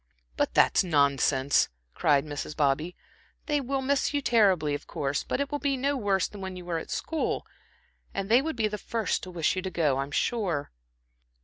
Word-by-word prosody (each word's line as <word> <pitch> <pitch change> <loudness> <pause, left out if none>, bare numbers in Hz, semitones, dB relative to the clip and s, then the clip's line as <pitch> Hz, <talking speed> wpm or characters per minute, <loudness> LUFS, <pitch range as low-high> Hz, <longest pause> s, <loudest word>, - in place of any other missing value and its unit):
"But - - -1
that - - +5
is - - +5
nonsense," 140 -4 +2 0.2
cried 145 0 +2
Mrs. 150 0 -6
Bobby. 150 +4 +1 0.5
"They 295 -2 +1
will 270 +1 -2
miss 280 +2 +1
you - - +3
terribly, 190 -12 +3
of 145 - -5
course, 140 0 -2
but - - -2
it 280 0 -2
will 290 - -1
be 280 -2 0
no 280 +2 0
worse 200 -6 +1
than 205 - -11
when 190 -1 -5
you 180 -1 -9
were 170 -2 -1
at - - -9
school, 320 -2 -2 0.7
and 195 0 -3
they 235 +5 +5
would 320 +1 -3
be 225 -2 +1
the 210 0 -5
first 225 -1 -1
to 185 - -8
wish 170 -2 0
you 185 - -1
to 190 - -4
go, 150 -7 +1
I'm 135 +1 -2
sure." 175 -3 -1
190 Hz, 205 wpm, -28 LUFS, 150-245 Hz, 0.7 s, that